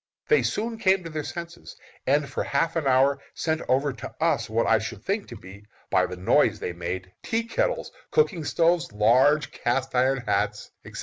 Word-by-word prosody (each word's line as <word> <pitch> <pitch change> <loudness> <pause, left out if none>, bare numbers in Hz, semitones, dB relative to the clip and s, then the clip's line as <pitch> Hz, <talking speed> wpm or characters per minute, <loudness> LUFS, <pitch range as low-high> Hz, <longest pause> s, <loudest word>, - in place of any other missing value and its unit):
They 455 - +5
soon 225 +1 -2
came 190 -3 +3
to 165 - -7
their 155 -1 -3
senses, 170 +2 -8 0.3
and 140 +2 +2
for - - -3
half 150 +5 0
an 160 -4 0
hour 135 +2 +3
sent 160 -1 -1
over 135 +2 +2
to - - -8
us 160 -10 +1
what 115 +1 +1
I 115 -1 +4
should 110 +1 -7
think 200 +1 -1
to - - -9
be, 95 +2 -12 0.3
by - - +3
the 90 - -7
noise 90 - +3
they 90 - -4
made, 90 +2 -5
tea 230 0 -1
kettles, - - -1 0.2
cooking 195 - +1
stoves, 170 +3 +1
large 130 +7 +3
cast 130 +2 -1
iron 130 +1 +2
hats, - - -1
etc. - - -9
140 Hz, 190 wpm, -25 LUFS, 115-170 Hz, 0.3 s, They